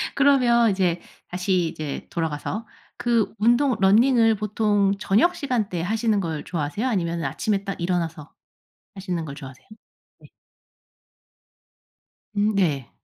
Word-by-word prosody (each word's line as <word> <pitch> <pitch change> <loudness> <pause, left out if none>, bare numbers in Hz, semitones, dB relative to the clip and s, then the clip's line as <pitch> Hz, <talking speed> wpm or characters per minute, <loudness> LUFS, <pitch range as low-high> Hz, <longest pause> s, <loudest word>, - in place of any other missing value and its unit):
그러면 250 -5 +4
이제 180 -3 0 0.3
다시 180 -1 0
이제 155 -3 -6
돌아가서 165 +7 -3 0.3
그 235 -2 +1
운동 240 +5 +3
러닝을 225 +3 +4
보통 210 -1 +1
저녁시간대 220 - 0
하시는 220 +3 0
걸 160 -5 -3
좋아하세요? 170 - -3
아니면 170 -7 -1
아침에 200 +2 -1
딱 195 -1 -5
일어나서 165 -4 -3 0.6
하시는 185 -4 -4
걸 140 -2 -7
좋아하세요? 135 -3 -12 0.5
네 - - -16 2.1
음 210 +1 +1
네. 150 -10 0
195 Hz, 265 characters per minute, -23 LUFS, 170-225 Hz, 2.1 s, 그러면